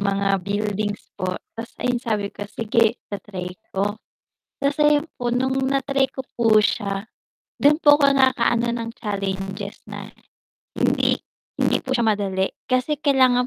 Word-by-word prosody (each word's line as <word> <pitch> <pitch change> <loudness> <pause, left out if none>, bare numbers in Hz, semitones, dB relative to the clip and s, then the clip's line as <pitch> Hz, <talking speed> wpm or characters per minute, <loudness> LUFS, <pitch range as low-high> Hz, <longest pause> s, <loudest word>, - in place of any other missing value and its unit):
Mga 195 -1 +1
buildings 205 +1 -2
po 185 0 -1 0.2
ta's 230 +1 -7
ayun 250 -1 0
sabi 210 -4 -2
ko, 205 0 -7
"Sige 230 +1 +1
ita-try 190 -3 -7 0.2
ko." 205 +2 0 0.6
Ta's 280 +1 +1
ayun 295 0 +4
po, 245 -1 -2
nung 260 +2 +1 0.2
na-try 275 0 +1
ko 265 0 -7
po 225 -2 +4
siya, 200 -1 +1 0.6
dun 290 +1 +6
po 290 -2 +5
ko 280 - +6
naka-ano 240 -3 +3
ng 230 -1 -4
challenges 195 -3 -4
na - - -8 0.7
hindi - - +2 0.4
hindi - - +2
po 260 - -6
siya 235 -3 +2
madali 195 -3 +1 0.2
kasi 255 +4 +1
kailangan 260 -4 +4
230 Hz, 145 wpm, -23 LUFS, 200-260 Hz, 0.7 s, dun